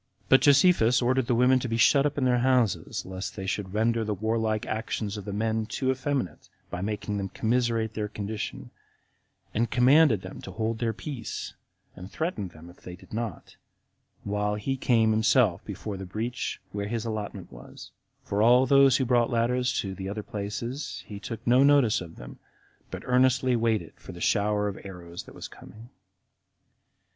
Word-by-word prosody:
But 130 - +6
Josephus 145 -4 +5
ordered 130 0 +1
the 120 - +2
women 125 +2 +4
to 125 - -3
be 115 -1 -1
shut 140 +4 +5
up 145 - -6
in 135 - +1
their 125 -1 +3
houses, 125 -5 +1
lest 95 +1 -6
they 95 - -5
should 95 0 -3
render 115 +1 +2
the 105 -1 -2
warlike 110 +1 -1
actions 110 -1 -3
of 105 -2 -7
the 100 - -4
men 110 +1 -1
too 130 +2 -1
effeminate, 130 -5 -3 0.2
by 90 - -4
making 105 0 -3
them 95 -1 -3
commiserate 115 -1 0
their 105 -2 -2
condition, 105 0 -5 0.8
and 115 +2 0
commanded 125 - +5
them 95 - -9
to - - -9
hold 110 +3 -2
their 115 -2 0
peace, 120 +1 -6 0.4
and 90 +2 -10
threatened 160 - -3
them 85 0 -14
if 90 - -15
they 90 - -10
did 95 +2 -17
not, 110 -5 -5 0.7
while 105 0 -1
he 105 +6 -2
came 115 -4 +3
himself 110 -3 +3
before 100 0 -6
the 95 - -6
breach, 115 +6 -3
where 100 0 -3
his 115 +1 -3
allotment 105 -4 -5
was; - - -12 0.3
for 100 +1 -1
all 125 +3 +6
those 135 0 +5
who 130 - 0
brought 120 -1 +2
ladders 125 +2 +1
to 95 -1 -5
the 95 0 -6
other 105 +1 -4
places, 115 +8 -5
he 100 -1 -8
took 115 +2 -7
no 125 +2 +5
notice 140 -7 +4
of 85 -2 -9
them, - - -11 0.5
but - - -7
earnestly 130 0 +3
waited 115 -2 0
for - - -11
the - - -10
shower 105 0 +1
of 100 - -5
arrows 90 -3 -8
that - - -14
was - - -7
coming. 110 +5 -14
110 Hz, 180 wpm, -27 LUFS, 100-125 Hz, 0.8 s, But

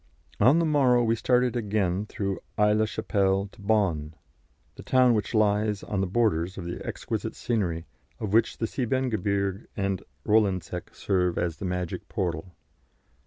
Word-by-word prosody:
On 130 +9 +6
the 170 - +2
morrow 130 -6 +4
we 115 0 +2
started 125 +1 +2
again 105 -3 0
through 100 -2 -3 0.2
Aix 105 0 +4
la 110 0 +3
Chapelle 100 -2 0
to - - -17
Bonn, 95 -8 0 0.6
the - - -11
town 130 -2 +4
which 110 +1 -1
lies 105 -1 +2
on 100 -2 -2
the 95 - 0
borders 95 -4 +1
of 90 - -6
the 85 - -5
exquisite - - -4
scenery 90 -8 -1 0.3
of 105 -2 -3
which 115 0 +3
the 115 - -1
Siebengebirge 110 -6 -1
and 100 -2 -1 0.2
Rolandseck 105 -4 0
serve 90 -2 0
as 85 -3 -1
the 100 - -5
magic 90 -1 -3
portal. 90 0 -3
100 Hz, 155 wpm, -27 LUFS, 95-115 Hz, 0.6 s, On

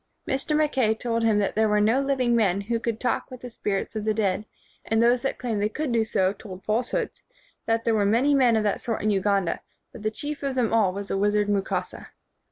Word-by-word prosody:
Mr. 275 +3 0
Mackay 265 -8 +2
told 230 0 -2
him 225 -2 +3
that 205 -1 0
there 220 0 +3
were 210 0 +3
no 225 +6 +3
living 260 -3 +1
men 200 -5 +2
who 230 +3 -2
could 230 -1 -3
talk 250 - -1
with 255 -2 -10
the 245 - -8
spirits 205 -1 -3
of 215 - -2
the 215 0 0
dead 210 0 0 0.4
and 225 - 0
that 230 - +4
those 245 0 +3
who 270 - 0
claimed 225 -5 -3
they 210 - +1
could 300 +3 -3
do 230 -1 +2
so 195 -3 +1
told 190 -2 -10
falsehoods, 255 - -1 0.5
that 225 0 +1
there 230 - +2
were 210 -2 +2
many 235 +8 +3
men 255 -4 +4
of 220 - +1
that 205 - 0
sort 230 -3 -3
in 215 - +2
Uganda, 195 -2 +1 0.3
but 235 - -11
the 215 - 0
chief 290 +6 -6
of 275 -2 -2
them 240 -4 +1
all 215 -5 +3
was 200 +1 -6
the - - -1
wizard 205 0 +2
Mukasa. 200 -2 -2
220 Hz, 240 wpm, -25 LUFS, 205-245 Hz, 0.5 s, that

